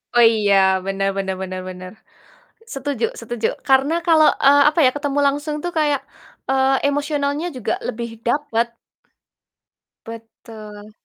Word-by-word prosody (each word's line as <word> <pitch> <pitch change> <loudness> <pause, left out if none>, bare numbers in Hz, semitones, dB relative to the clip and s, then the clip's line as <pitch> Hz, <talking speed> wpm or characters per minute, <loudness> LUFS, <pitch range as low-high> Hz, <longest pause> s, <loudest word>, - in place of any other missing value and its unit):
Oh 240 - +6
iya, 205 -3 +2 0.3
bener 195 0 -1
bener 190 -1 -2
bener 185 0 -5
bener. 185 0 -9 0.8
Setuju 275 -3 -3 0.2
setuju. 230 -1 -3 0.2
Karena 270 +4 +3
kalau, 315 -2 +5 0.2
eee, 285 +1 +6
apa 310 - -6
ya, - - +5
ketemu 290 -1 -2
langsung 290 +2 -1
tuh 350 - -3
kayak, 295 -3 +1 0.5
eee, 265 0 +2
emosionalnya 290 +2 -1
juga 250 - -2
lebih 230 0 -6
dapet. 235 -3 0 1.4
Betul. 220 -2 -11
255 Hz, 125 wpm, -20 LUFS, 215-285 Hz, 1.4 s, Oh